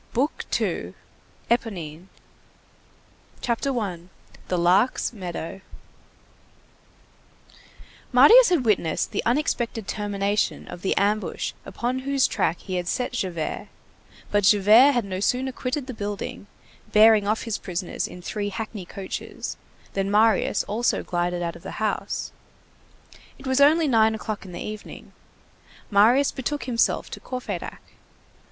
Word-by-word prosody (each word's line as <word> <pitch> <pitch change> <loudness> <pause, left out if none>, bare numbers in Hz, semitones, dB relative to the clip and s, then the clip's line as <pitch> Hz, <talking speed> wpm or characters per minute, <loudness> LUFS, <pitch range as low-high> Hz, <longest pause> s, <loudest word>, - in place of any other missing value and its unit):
BOOK 270 +6 -1
SECOND—ÉPONINE 185 -7 -4 1.3
CHAPTER 250 +2 -1
I—THE 180 -2 -6
LARK'S 185 +10 +2
MEADOW 185 -2 -6 2.5
Marius - - +8
had 330 -9 +2
witnessed 185 -7 +1
the - - -1
unexpected 235 -5 0
termination 205 -1 -1
of 175 - -8
the 190 - 0
ambush 200 -3 0
upon 240 +6 -2
whose 275 0 +1
track 180 -5 0
he 185 -2 -4
had 175 -1 -3
set 250 +6 -1
Javert; 180 -9 -3 0.6
but 205 0 +2
Javert 215 +8 +6
had 240 -4 0
no 185 -1 -4
sooner 255 +6 0
quitted 255 +2 -3
the 260 - -6
building, 205 -1 -5 0.4
bearing 215 -1 +6
off 215 +1 0
his 230 -3 -3
prisoners 180 -1 -3
in 180 - -11
three 205 +2 -3
hackney 210 -2 -6
coaches, 190 0 -6 0.4
than 195 0 -1
Marius 215 0 +3
also 225 +4 0
glided 175 0 -1
out 170 -1 -3
of - - -12
the - - -8
house. 215 -1 -2 1.1
It 270 - -14
was 260 +1 +2
only 310 +3 +5
nine 220 -3 +4
o'clock 215 -2 -5
in 185 - -10
the 175 - -6
evening. 215 -1 -9 0.8
Marius 235 +8 +5
betook 290 +3 -3
himself 235 -3 0
to - - -6
Courfeyrac. 255 -1 -6
210 Hz, 125 wpm, -24 LUFS, 190-245 Hz, 2.5 s, Marius